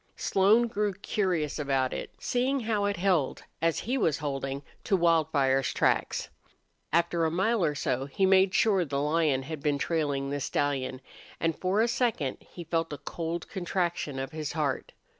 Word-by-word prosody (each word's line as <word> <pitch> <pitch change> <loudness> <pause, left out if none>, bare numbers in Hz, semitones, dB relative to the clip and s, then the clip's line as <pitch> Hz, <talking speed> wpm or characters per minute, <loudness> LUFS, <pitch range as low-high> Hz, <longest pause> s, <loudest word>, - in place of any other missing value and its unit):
Slone 205 +5 +4
grew 210 -3 -1
curious 180 -7 -1
about 135 -3 0
it, - - -4
seeing 260 +2 0
how 215 -3 0
it 205 -2 0
held, 175 -6 +1 0.2
as 165 -1 +1
he 255 +4 -1
was 160 - +2
holding, 135 -1 -3 0.2
to 195 - +2
Wildfire's 155 -6 +2
tracks. - - +1 0.6
After 170 +1 +2
a 160 - +3
mile 190 +5 +1
or 150 -3 +1
so 130 -1 -1
he 165 +8 +1
made 190 0 +5
sure 200 -5 +4
the 140 -3 -2
lion 150 -2 +1
had 155 +1 -6
been 145 -1 +1
trailing 140 -3 -1
the 145 - -1
stallion, 135 -2 -1 0.4
and 165 -1 0
for 190 +3 +1
a 230 - +3
second 230 - 0
he 175 - -10
felt 165 0 -1
a 145 - -4
cold 165 +4 -4
contraction 175 -5 -2
of 135 +2 -4
his 155 -2 -4
heart. 150 -4 -2
165 Hz, 170 wpm, -28 LUFS, 140-190 Hz, 0.6 s, made